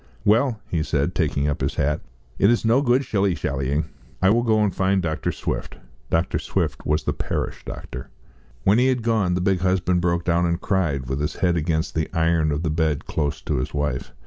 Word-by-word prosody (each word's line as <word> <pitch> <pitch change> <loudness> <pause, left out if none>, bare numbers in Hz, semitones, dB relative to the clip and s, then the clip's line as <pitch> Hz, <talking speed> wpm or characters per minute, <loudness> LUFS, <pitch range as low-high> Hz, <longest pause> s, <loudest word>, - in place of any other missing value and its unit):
"Well," 115 +2 +3
he 80 - -1
said, 75 -2 0
taking 70 +1 0
up 75 - -2
his - - -1
hat, 75 +2 0 0.4
"it 100 - +5
is 120 -1 +2
no 115 +5 +4
good 130 0 +2
shilly 100 -5 +1
shallying. 70 +1 -1 0.3
I 95 +1 +4
will 120 +2 +3
go 110 -2 +3
and 100 - +1
find 95 +1 +2
Dr. 80 -3 -1
Swift." - - -4 0.3
Dr. 85 +3 +1
Swift - - -2
was 75 +1 +1
the - - 0
parish - - -3
doctor. - - -7 0.5
When 105 +4 +4
he 125 - +4
had 130 -3 +1
gone, 110 -6 +1
the 90 - -1
big 95 0 +2
husband 90 -1 +1
broke 85 0 0
down 85 0 +2
and 85 0 0
cried, 80 -9 0
with 65 +2 -2
his 75 - -2
head 90 -2 +1
against 80 0 -1
the 80 -1 -1
iron 80 -1 +2
of 75 +3 -2
the 80 - 0
bed 80 -2 0
close 75 -2 -2
to - - -1
his 65 - -3
wife. 70 -3 -2
85 Hz, 210 wpm, -23 LUFS, 75-100 Hz, 0.5 s, it